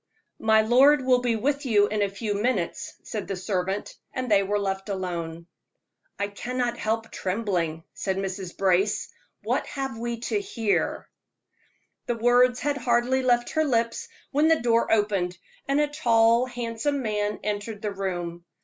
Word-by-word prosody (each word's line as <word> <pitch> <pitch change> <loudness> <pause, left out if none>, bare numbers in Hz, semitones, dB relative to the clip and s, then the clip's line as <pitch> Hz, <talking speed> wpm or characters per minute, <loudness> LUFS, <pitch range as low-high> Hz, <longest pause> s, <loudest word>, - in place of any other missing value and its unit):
"My 220 0 +4
lord 260 +4 +5
will 250 -1 +4
be 240 -2 +1
with 280 +6 0
you 210 -6 +4
in 210 0 -1
a 200 - +2
few 205 +2 -3
minutes," 205 -4 -1
said 210 -3 -5
the 195 - -2
servant, 190 +1 -2 0.2
and 255 -3 -4
they 200 -1 +6
were 200 +1 0
left 195 0 -3
alone. 170 -4 -4 0.7
"I 200 - 0
cannot 240 +3 -3
help 225 +1 -2
trembling," 180 -5 -2
said 190 -1 -2
Mrs. 190 -2 -4
Brace. 195 +2 +2 0.3
"What - - 0
have 270 -5 -4
we 235 0 -3
to 410 - -1
hear?" 230 - -1 1.0
The 240 - 0
words 245 +2 +4
had 290 +1 0
hardly 245 0 +2
left 240 -2 +2
her 315 - +2
lips, 235 - 0 0.2
when 295 +3 +3
the 325 0 +4
door 230 -1 +2
opened, 200 -5 +1 0.3
and 275 +1 +2
a 295 - +4
tall, 235 -4 +3
handsome 245 +3 -2
man 210 -1 -1
entered 210 +1 -4
the 210 - -1
room. 175 -3 -4
225 Hz, 160 wpm, -26 LUFS, 195-250 Hz, 1.0 s, they